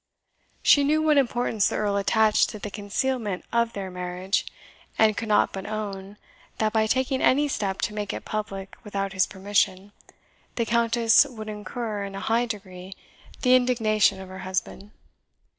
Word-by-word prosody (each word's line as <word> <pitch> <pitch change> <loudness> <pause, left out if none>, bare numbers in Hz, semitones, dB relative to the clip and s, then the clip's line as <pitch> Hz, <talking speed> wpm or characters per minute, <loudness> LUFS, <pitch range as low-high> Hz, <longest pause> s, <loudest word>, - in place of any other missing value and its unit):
She 285 - +6
knew 300 +2 +2
what 305 -2 +4
importance 240 -5 +1
the - - -3
Earl 205 -1 0
attached 215 +2 +3
to - - -7
the 210 0 -7
concealment 210 0 -2
of 235 0 +1
their 195 -2 -5
marriage, 180 +2 -2 0.5
and 215 -1 +4
could 230 - -4
not 210 -1 +3
but 190 0 -6
own, 205 -2 -5 0.4
that 215 -1 0
by 220 -1 +2
taking 260 +3 0
any 290 +3 +3
step 195 -8 -2
to 210 - -1
make 210 -1 -3
it - - -7
public 195 -2 -5
without 195 -2 -3
his 190 -1 +2
permission, 195 0 -1 0.6
the 230 - 0
Countess 235 +3 +4
would 220 -4 -8
incur, 210 0 -4
in 195 0 -6
a - - -4
high 230 +3 +1
degree, 190 -3 -8 0.5
the 250 -1 +5
indignation 215 -6 +2
of 190 - -9
her 190 0 -9
husband. 190 +2 -4
210 Hz, 165 wpm, -25 LUFS, 195-235 Hz, 0.6 s, She